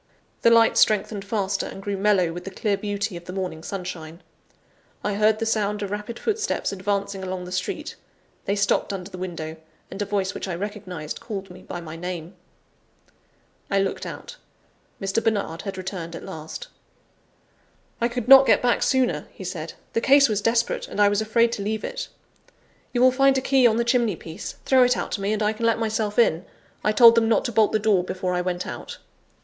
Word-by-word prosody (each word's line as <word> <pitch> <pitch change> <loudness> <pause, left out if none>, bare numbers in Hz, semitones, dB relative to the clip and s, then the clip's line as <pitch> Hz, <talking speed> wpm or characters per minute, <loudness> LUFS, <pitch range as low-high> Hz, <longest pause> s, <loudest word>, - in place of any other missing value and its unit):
The - - +6
light 230 -1 +5
strengthened 210 -1 +2
faster, 200 -1 -1
and - - -8
grew 200 +1 -3
mellow 195 -4 +2
with 175 +1 -7
the 195 - -6
clear 200 +1 -1
beauty 205 -1 -3
of 170 0 -9
the 180 - -7
morning 185 -4 -4
sunshine. 175 -3 -7 0.8
I 205 - 0
heard 215 +1 +3
the 225 - -2
sound 210 -2 0
of 200 - -4
rapid 210 +3 -5
footsteps 445 +1 -1
advancing 200 0 -2
along 185 -1 -4
the 180 - -9
street; 185 0 -3 0.5
they 200 - 0
stopped 200 0 +1
under 190 0 -6
the 185 - -8
window: 165 -3 -5 0.3
and 195 - -6
a - - 0
voice 200 -1 -1
which - - -5
I 180 - -3
recognized, 185 -5 -6
called 195 -4 -6
me 180 +1 -12
by 175 - -7
my 160 -1 -8
name. 175 0 -6 1.4
I 200 - +1
looked 195 0 -2
out: - - -8 0.6
Mr. 195 +3 -1
Bernard 200 -7 -1
had 195 -2 -6
returned 180 -3 -5
at - - -8
last. 160 - -7 1.3
"I 235 - +3
could 245 -1 -4
not 270 0 +9
get - - +4
back 245 -1 +2
sooner," 250 - +1
he - - -10
said; 170 -3 -5 0.2
"the 230 - +1
case 275 +2 +6
was 210 -2 -1
desperate, 230 +2 +1
and - - -6
I 205 -1 +6
was 205 +1 +1
afraid 230 +2 +2
to 210 - -3
leave 215 +2 -2
it. - - -4 0.8
You 245 - 0
will 255 0 +7
find 270 +1 +4
a - - +1
key 260 -2 +4
on 225 -1 +2
the 235 - +1
chimney 235 -2 +2
piece 160 0 -8
throw 260 -1 +5
it 250 0 +4
out - - -4
to 200 - -2
me, 200 +1 0
and 215 0 0
I 210 +1 +2
can 230 +1 -1
let 230 - +3
myself 220 -2 -1
in; 180 -8 +3 0.4
I 210 - +3
told 230 +2 +8
them 230 -1 +3
not 225 - +2
to 240 - -1
bolt 220 -1 +3
the - - +3
door 205 -4 +2
before 185 0 -3
I 180 - 0
went 180 0 -2
out." - - -7
205 Hz, 210 wpm, -24 LUFS, 185-225 Hz, 1.4 s, not